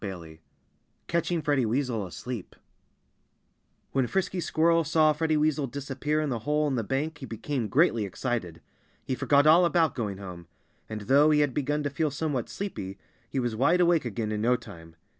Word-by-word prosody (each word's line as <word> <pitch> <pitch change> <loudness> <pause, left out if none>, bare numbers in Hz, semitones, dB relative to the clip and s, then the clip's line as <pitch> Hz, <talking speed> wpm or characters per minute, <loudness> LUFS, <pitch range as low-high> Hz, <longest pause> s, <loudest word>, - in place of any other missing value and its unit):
XXII 85 -5 -7 0.7
Catching 170 0 0
Freddie 145 -3 +2
Weasel 115 -4 -1
Asleep 100 +5 -7 1.4
When 130 -2 +1
Frisky 190 +2 -1
Squirrel 165 0 +2
saw 155 0 +3
Freddie 155 0 0
Weasel 150 -2 +1
disappear 140 +3 -2
in 150 - -1
the 120 - -1
hole 150 +6 0
in 140 - -1
the 120 -3 0
bank 145 +6 -2
he 135 - -7
became 115 +2 -3
greatly 130 -4 +3
excited. 100 -4 -3 0.4
He - - -2
forgot 140 +2 +3
all 165 +4 +7
about 170 -2 +3
going 105 -6 -3
home. 90 -3 -9 0.4
And 110 -1 -5
though 140 +8 +4
he 150 -1 +4
had 145 -3 +1
begun 145 +2 -1
to 145 - -2
feel 155 +2 0
somewhat 145 -4 -2
sleepy, 100 - -5 0.3
he 135 - -2
was 120 -3 -1
wide 155 +10 +3
awake 175 -2 +4
again 115 -2 -3
in 105 0 -2
no 120 +3 +3
time. 80 -7 -11
135 Hz, 180 wpm, -27 LUFS, 110-155 Hz, 1.4 s, all